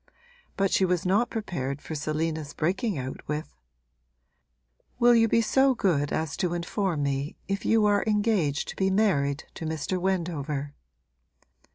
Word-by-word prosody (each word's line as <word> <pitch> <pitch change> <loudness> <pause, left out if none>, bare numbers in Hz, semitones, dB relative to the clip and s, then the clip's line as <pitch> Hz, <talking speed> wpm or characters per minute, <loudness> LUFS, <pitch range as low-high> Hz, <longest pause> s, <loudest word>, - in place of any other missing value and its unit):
But 195 -1 +2
she - - +3
was 180 -2 +1
not 205 +6 +2
prepared 140 - -3
for 160 - -8
Selina's 155 0 -2
breaking 190 +4 0
out 130 0 -5
with: 150 - -4 1.4
'Will 240 0 +6
you 225 -1 +5
be 230 +1 +3
so 265 +3 +3
good 160 -10 +1
as 155 -2 -2
to 175 -1 0
inform 170 -2 -1
me 140 +1 -2
if 195 0 -2
you 225 -1 +4
are 205 -1 +3
engaged 205 -9 +1
to - - -6
be 190 0 +1
married 165 -9 +1
to - - -8
Mr. 160 +4 -2
Wendover?' 155 -6 -2
175 Hz, 150 wpm, -27 LUFS, 145-205 Hz, 1.4 s, Will